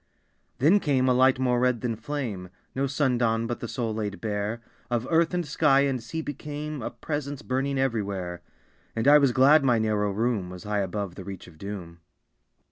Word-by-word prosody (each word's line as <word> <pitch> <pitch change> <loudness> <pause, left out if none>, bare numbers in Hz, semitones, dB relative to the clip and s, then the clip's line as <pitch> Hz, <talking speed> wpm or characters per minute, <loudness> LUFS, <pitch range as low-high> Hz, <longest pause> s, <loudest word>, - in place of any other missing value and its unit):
Then 165 +10 +5
came 135 -7 +1
a 125 - +4
light 130 +1 +4
more 125 -2 +1
red 125 -2 +1
than 120 -2 -1
flame; 110 -7 -4 0.2
No 135 +1 0
sun 135 -2 +1
dawn, 115 -1 +1
but 120 0 -3
the 120 - -5
soul 115 -2 -2
laid 105 -2 -3
bare 105 +1 -2 0.3
Of 120 0 -1
earth 165 0 +3
and 175 -1 -1
sky 145 -1 +3
and 135 -3 0
sea 160 +8 -5
became 150 0 -5
A - - -3
presence 145 +3 -5
burning 135 +2 -1
everywhere; 100 -9 -2 0.5
And 115 +3 0
I 150 +1 +8
was 140 -3 +4
glad 140 +4 +6
my 125 -3 +4
narrow 105 -2 +1
room 105 -2 -1
Was 90 -1 -9
high 105 0 -1
above 100 -1 -3
the 95 - -9
reach 95 -1 -8
of 80 -3 -16
doom. 90 -4 -7
120 Hz, 195 wpm, -26 LUFS, 105-140 Hz, 0.5 s, I